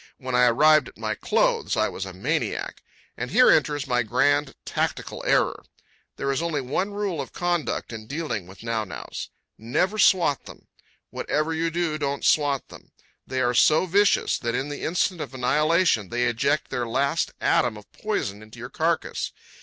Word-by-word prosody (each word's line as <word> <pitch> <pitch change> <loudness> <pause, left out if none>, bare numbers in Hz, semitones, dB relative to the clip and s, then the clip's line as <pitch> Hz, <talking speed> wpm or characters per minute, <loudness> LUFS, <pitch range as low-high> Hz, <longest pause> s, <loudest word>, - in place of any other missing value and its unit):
When 130 -2 -6
I 125 0 +5
arrived 155 +6 +5
at - - -14
my - - -2
clothes, - - +1
I - - +3
was - - -5
a - - -7
maniac. - - -2 0.3
And - - -4
here 255 - +6
enters 145 -2 +2
my 125 -2 +1
grand 135 +5 +1
tactical - - -3
error. - - +2 0.5
There 140 - -1
is 135 - -1
only 165 -3 -1
one 140 +9 -1
rule 200 -6 -2
of 135 - -9
conduct 175 -8 -2
in 110 -1 -8
dealing 120 - -4
with 95 +3 -13
nau 115 -2 -1
naus. 95 - -7 0.3
Never 180 - 0
swat 170 -10 +3
them. - - -13 0.5
Whatever 155 +2 -1
you 165 +1 0
do, 165 -2 -1
don't 140 -1 -2
swat 145 -3 +2
them. - - -14 0.4
They 130 0 -1
are 120 0 +2
so 155 +7 +4
vicious 200 +3 +2
that 115 -1 -2
in 135 +3 -2
the 145 - -6
instant 175 0 0
of 130 - -6
annihilation 150 - +2
they 120 +1 0
eject 120 +5 0
their 120 -1 -2
last 140 +7 0
atom 115 -3 +2
of 105 - -15
poison 110 - -3
into 110 0 -14
your - - -8
carcass. - - -1
145 Hz, 175 wpm, -25 LUFS, 120-165 Hz, 0.5 s, here